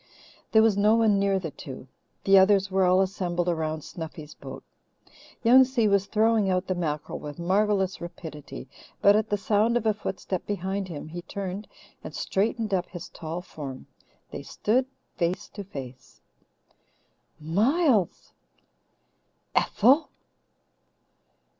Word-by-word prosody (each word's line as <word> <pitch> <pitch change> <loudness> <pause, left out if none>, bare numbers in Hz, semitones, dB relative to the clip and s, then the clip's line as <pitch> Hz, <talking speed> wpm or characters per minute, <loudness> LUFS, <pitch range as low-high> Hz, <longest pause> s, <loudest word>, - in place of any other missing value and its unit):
There 220 0 +6
was 220 -3 +4
no 210 +2 +4
one 220 -3 +3
near 195 -1 +2
the 170 -5 -4
two. 130 -2 -9 0.4
The 195 - +5
others 195 0 +4
were 190 0 +3
all 185 +1 +4
assembled 180 -2 -1
around 160 -2 -1
Snuffy's 155 -2 -8
boat. - - -10 0.8
Young 250 +3 +8
Si 250 -4 +1
was 200 -1 +2
throwing 220 -2 +2
out 185 0 +1
the 185 - -1
mackerel 155 -4 -3
with 150 +1 -8
marvellous 190 +2 +1
rapidity, 160 -5 -8 0.3
but 200 0 +6
at 215 0 +1
the 205 - +1
sound 215 +4 +2
of 235 - -3
a 215 - +3
footstep 190 -3 -4
behind 195 0 -2
him 155 -3 -7
he 175 +2 -6
turned 195 +2 -5 0.4
and - - -8
straightened 215 +1 -1
up 180 -1 0
his 175 -2 -8
tall 165 +2 -6
form. 135 -7 -8 0.5
They - - -6
stood 255 +5 0 0.3
face 175 +1 -1
to 205 - -8
face. 130 -8 -10 1.2
"Miles!" 210 - +1 1.2
"Ethel!" 265 +9 +3
195 Hz, 135 wpm, -26 LUFS, 170-210 Hz, 1.2 s, Young